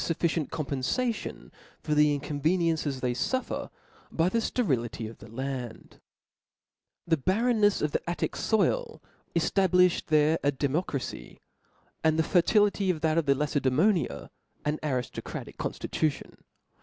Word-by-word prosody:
fufficient 165 -2 0
compenfation 155 - -2 0.3
for 150 - -2
tlie 150 -1 +4
inconveniences 150 -1 0
they 125 -1 0
fuffer 260 - -2 0.4
by 165 +2 +2
the 230 - +1
fterility 125 - -1
of 110 - -11
the 110 - -12
land 125 -1 -6 1.1
The 165 -1 +2
barrenness 205 - +2
.of. 150 - +1
the - - -2
Attic 175 - -1
ioil: 460 - 0 0.4
cQ;abIifljcd 180 +1 +3
ihtre 155 0 +4
a 145 - +3
democracy; 140 0 -3 0.6
and 160 0 +3
the 160 - +3
fertility 200 +3 +3
of 165 -4 0
that 160 0 +2
of 165 - -2
JLaced^mpnia 145 - +1 0.4
an 150 +1 0
ariftocratical 130 -5 -4
conftitution. 155 -2 -3
155 Hz, 120 wpm, -28 LUFS, 140-185 Hz, 1.1 s, tlie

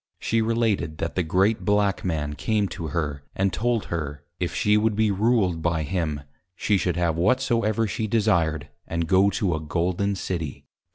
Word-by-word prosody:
She 115 0 0
related, 110 -8 0
that 80 - -3
the 90 - 0
great 95 +6 +1
Black 105 -1 +1
Man 75 -5 -2
came 105 +7 0
to 80 - -5
her, 75 -2 -2
and 95 0 +1
told 120 -1 0
her, 75 -3 -4 0.2
if 90 -1 -1
she 105 0 +3
would 105 0 +2
be 110 0 +2
ruled 100 -5 +2
by 85 -1 0
him, 80 -3 -2 0.3
she 105 - +1
should 90 -3 0
have 85 -2 +1
whatsoever 115 +2 +2
she 110 +1 -2
desired, 85 -9 +1 0.2
and 85 0 -1
go 95 +2 +4
to 95 -2 0
a 80 - -1
Golden 90 +6 -1
City. 85 -6 -4
95 Hz, 175 wpm, -25 LUFS, 80-105 Hz, 0.3 s, go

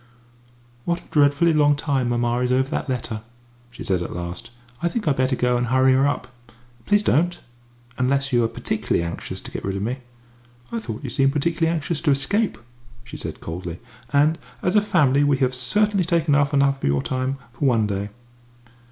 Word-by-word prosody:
"What 170 +4 -1
a - - -22
dreadfully 145 +3 +4
long 145 -1 +4
time 140 -4 0
mamma 120 0 +1
is 125 0 0
over 130 +1 +2
that 150 - -3
letter!" 120 -4 -3 0.5
she - - -9
said 95 -2 0
at 85 - -5
last. 90 +7 -5 0.3
"I 170 - +1
think 210 0 -3
I'd 145 - +3
better 130 0 +1
go 125 0 +1
and 120 0 -1
hurry 130 +2 +4
her 135 +2 +4
up." 145 - -2 0.6
"Please 205 0 +4
don't 175 0 +2 0.6
unless 135 +1 +1
you 120 -1 +4
are - - +3
particularly 115 -6 -1
anxious 85 0 -5
to - - -10
get - - -5
rid 95 0 -2
of 100 - -2
me." 125 +5 -2 0.7
"I 230 - -2
thought 110 - -6
you - - -4
seemed 135 0 +2
particularly 165 +2 +1
anxious 160 -1 -1
to 160 - +1
escape," 145 - +1 0.5
she - - -10
said - - -6
coldly. 85 +1 -6 0.3
"And, 150 +3 +3 0.2
as 180 +3 +1
a 210 - +6
family, 145 -9 +3
we 145 -1 +3
have 130 -1 +1
certainly 200 +11 +2
taken 170 -3 +1
up 140 0 +3
quite 145 - 0
enough 140 0 +2
of - - 0
your 70 -1 +1
time 130 +1 -2 0.2
for 125 - -2
one 115 -4 +3
day." 100 0 -3
135 Hz, 200 wpm, -23 LUFS, 120-155 Hz, 0.7 s, a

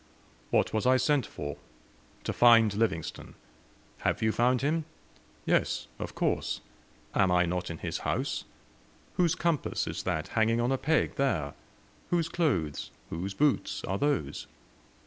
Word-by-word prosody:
"What - - +2
was 110 +3 +1
I 130 0 +6
sent 135 -1 +2
for?" 75 0 -6 0.7
"To - - -2
find 115 -3 +6
Livingstone." 100 -7 -2 0.6
"Have - - 0
you 110 - +3
found 125 +3 +2
him?" 155 +2 +1 0.6
"Yes, - - +1
of - - -5
course; - - 0 0.5
am 95 -2 +3
I 90 0 +4
not 90 +1 -2
in 85 - -5
his - - -3
house? - - -2 0.7
Whose 175 -3 +3
compass 170 -4 0
is - - -4
that 80 -4 -2
hanging 115 +1 +2
on 120 +2 +1
a 135 - +2
peg 160 +3 +1
there? 90 - 0 0.6
Whose 170 -2 +1
clothes, 90 - 0 0.2
whose 95 +4 -4
boots, 145 +3 +1
are 95 +1 -2
those? 140 - -1
115 Hz, 145 wpm, -29 LUFS, 90-145 Hz, 0.7 s, I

